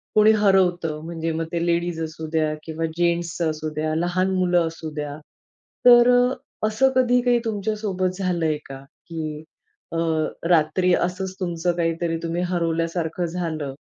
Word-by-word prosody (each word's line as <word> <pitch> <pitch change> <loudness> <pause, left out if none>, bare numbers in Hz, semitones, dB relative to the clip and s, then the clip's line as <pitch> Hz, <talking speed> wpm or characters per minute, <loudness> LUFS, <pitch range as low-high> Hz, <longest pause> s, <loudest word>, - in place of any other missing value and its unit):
कुणी 215 0 +7
हरवतं 185 -6 +2
म्हणजे 165 -1 -3
मग 165 +1 -2
ते 170 0 0
लेडीज 170 -1 0
असू 160 0 -6
द्या 155 -1 +1
किंवा 160 0 -3
जेन्ट्स 170 -1 0
असू 155 -1 -2
द्या 155 0 -1
लहान 175 +3 0
मुलं 175 -2 +2
असू 160 -1 -7
द्या. 145 -1 -4 0.7
तर 240 0 +8 0.2
अ, 255 -4 -5
असं 225 +5 +2
कधी 250 -1 +4
काही 245 -1 +3
तुमच्यासोबत 205 -3 -2
झालंय 170 -4 0
का? 135 0 -9 0.3
की 155 -2 -5 0.5
अ, - - -1 0.5
रात्री 175 +2 +3
असंच 185 +2 -1
तुमचं 175 -1 -1
काहीतरी 165 0 -1
तुम्ही 170 +1 -2
हरवल्यासारखं 165 0 -1
झालं 165 -5 -3
170 Hz, 145 wpm, -23 LUFS, 160-185 Hz, 0.7 s, तर